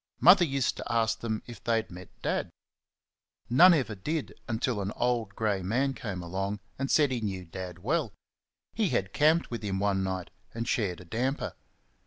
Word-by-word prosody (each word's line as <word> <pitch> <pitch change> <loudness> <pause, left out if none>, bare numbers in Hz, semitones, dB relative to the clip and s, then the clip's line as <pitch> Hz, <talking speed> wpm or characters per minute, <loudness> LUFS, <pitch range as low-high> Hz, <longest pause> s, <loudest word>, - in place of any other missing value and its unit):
Mother 190 -3 +8
used 135 -4 0
to - - -5
ask 115 -1 +1
them 110 -2 -3
if 120 -4 -11
they 115 -1 +2
had 110 -3 -2
met 90 +1 -10
Dad? - - 0 1.0
None 175 +9 +8
ever 125 -8 -1
did 150 +10 -3
until 115 -2 -1
an 100 +1 -2
old 120 -5 0
grey 105 -3 0
man 125 +9 +1
came 100 -7 -5
along 95 +4 -3 0.2
and 135 0 -1
said 145 -3 +4
he 125 -3 -1
knew 95 -4 -3
Dad 90 0 -7
well 150 -1 0 0.6
he - - +1
had 95 0 -1
camped 155 +1 +3
with 115 - -3
him 100 -3 -2
one 95 -1 +1
night 95 -2 -3 0.2
and 115 0 -3
shared 95 -7 0
a - - -12
damper. 125 +10 -2
110 Hz, 185 wpm, -29 LUFS, 95-130 Hz, 1.0 s, Mother